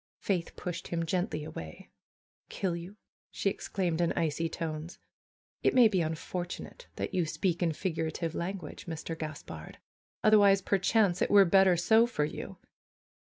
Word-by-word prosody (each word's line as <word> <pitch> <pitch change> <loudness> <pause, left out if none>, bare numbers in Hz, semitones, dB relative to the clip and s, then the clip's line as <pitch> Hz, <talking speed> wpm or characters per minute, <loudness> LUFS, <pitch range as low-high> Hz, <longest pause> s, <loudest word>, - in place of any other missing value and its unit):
Faith 180 -4 -2
pushed 175 0 -5
him 165 -1 -2
gently 180 -1 -1
away. 80 - -9 0.6
"Kill 185 -3 -2
you!^' 175 +4 -8 0.3
she 195 - 0
exclaimed 175 -4 -2
in 170 - +2
icy 165 +1 -1
tones. 160 0 -5 0.6
"It - - +2
may 245 -3 +8
be 190 -5 +1
unfortunate 175 - -5
that - - -4
you 180 -3 +1
speak 175 +2 -1
in 170 -2 +2
figurative 165 -1 -2
language, 180 +2 -5
Mr. 165 0 -4
Gaspard. 150 - -7 0.5
Otherwise 200 -2 +6
perchance 195 -1 +2
it - - +2
were 200 -1 +7
better 190 0 +5
so 220 +7 +5
for 150 -11 0
you." - - -7
175 Hz, 145 wpm, -30 LUFS, 160-195 Hz, 0.6 s, may